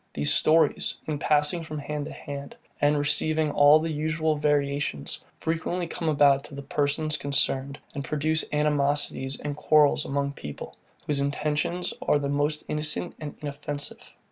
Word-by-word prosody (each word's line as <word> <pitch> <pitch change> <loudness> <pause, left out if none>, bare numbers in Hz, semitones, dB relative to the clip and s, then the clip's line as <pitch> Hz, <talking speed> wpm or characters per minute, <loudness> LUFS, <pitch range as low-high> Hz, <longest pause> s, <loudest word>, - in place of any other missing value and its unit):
These 75 0 +2
stories, 155 -1 +3
in 150 -2 -3
passing 150 +4 +2
from 155 -1 -6
hand 150 0 -4
to - - -7
hand, 140 0 -8 0.2
and 145 +1 +4
receiving 155 +1 +1
all 145 +1 +7
the 160 +1 -2
usual 155 +1 0
variations, 145 - -1 0.2
frequently 165 +2 -2
come 165 -1 -3
about 140 -2 +4
to 140 - -10
the 140 - -7
persons 150 +2 0
concerned, 140 -1 +1 0.2
and 140 - -4
produce 155 +2 0
animosities 145 -2 0
and 145 -1 -4
quarrels 150 -1 +4
among 140 0 -1
people, 75 - -8 0.3
whose 145 -2 0
intentions 150 +5 -1
are - - +3
the 140 -1 -2
most 145 +2 0
innocent 150 +3 -1
and 150 -2 -6
inoffensive. 145 0 -6
150 Hz, 150 wpm, -26 LUFS, 140-155 Hz, 0.3 s, all